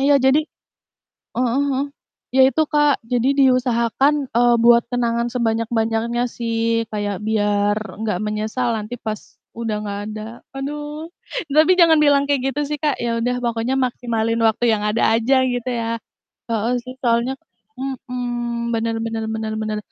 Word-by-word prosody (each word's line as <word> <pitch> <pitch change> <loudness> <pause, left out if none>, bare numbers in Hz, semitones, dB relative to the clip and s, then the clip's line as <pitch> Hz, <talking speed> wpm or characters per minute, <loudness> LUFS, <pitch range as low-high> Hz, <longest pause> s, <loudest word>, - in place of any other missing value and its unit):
iya, 280 +1 +4
jadi 265 +2 +5 1.0
heeh 250 +2 +1
heeh, 270 +1 0 0.5
ya - - +6
itu 290 +5 +1
Kak, 295 -1 +4 0.2
jadi 245 +2 +2
diusahakan, 255 +1 +3 0.2
eee, 240 0 +5
buat 235 0 +7
kenangan 235 -1 0
sebanyak-banyaknya 230 0 0
sih, 230 -1 0
kayak 205 -2 -2
biar 205 -1 +2 0.3
nggak 215 -5 -1
menyesal 215 +4 -2
nanti 215 +3 -5
pas 215 -2 -4 0.4
udah 225 -2 -2
nggak 205 -1 -4
ada, 215 0 -6 0.3
aduh. 295 +3 -5 0.4
Tapi 310 +5 +5
jangan 330 -2 +7
bilang 285 -1 +4
kayak 280 -3 +1
gitu 295 - -1
sih 300 - -2
Kak, 295 -2 +1
ya 230 -1 0
udah 250 +1 0
pokoknya 235 +2 0
maksimalin 230 -2 -1
waktu 225 +2 +2
yang 210 -1 0
ada 210 +2 0
aja 260 +3 +3
gitu 245 0 -2
ya 230 -1 -2 0.5
heeh, 230 +2 0
sih 255 - -7
soalnya 235 +2 +1 0.4
mhm, 245 -3 -3
benar 225 0 -1
benar 225 -1 -3
benar 220 0 -3
benar. 215 -1 -2
235 Hz, 150 wpm, -21 LUFS, 225-260 Hz, 1.0 s, buat